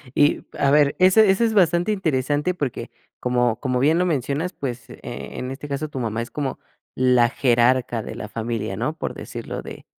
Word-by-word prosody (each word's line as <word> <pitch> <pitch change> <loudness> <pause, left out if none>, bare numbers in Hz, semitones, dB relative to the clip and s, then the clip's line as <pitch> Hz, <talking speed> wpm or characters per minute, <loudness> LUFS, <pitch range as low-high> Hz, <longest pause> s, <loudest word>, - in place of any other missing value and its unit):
Y 145 - +3
a 140 - +2
ver 145 -1 +4
ese 190 +3 +6
ese 195 +5 +3
es 220 - 0
bastante 175 0 +3
interesante 150 -2 0
porque 145 -8 -4 0.3
como 125 -2 +1
como 125 -2 -1
bien 155 +6 +3
lo 180 - +2
mencionas 150 +2 -1
pues, 125 -3 -6
eh, - - -11
en 130 +1 -6
este 145 +2 -7
caso 145 +2 -3
tu 135 - -5
mamá 115 -1 -2
es 120 - -7
como 140 -3 -3 0.4
la 125 -2 +4
jerarca 120 -2 +2
de - - -7
la 105 - -7
familia, 110 -4 -3
¿no? 150 +8 -2
Por - - -3
decirlo - - -6
de - - -10
135 Hz, 190 wpm, -22 LUFS, 120-160 Hz, 0.4 s, ese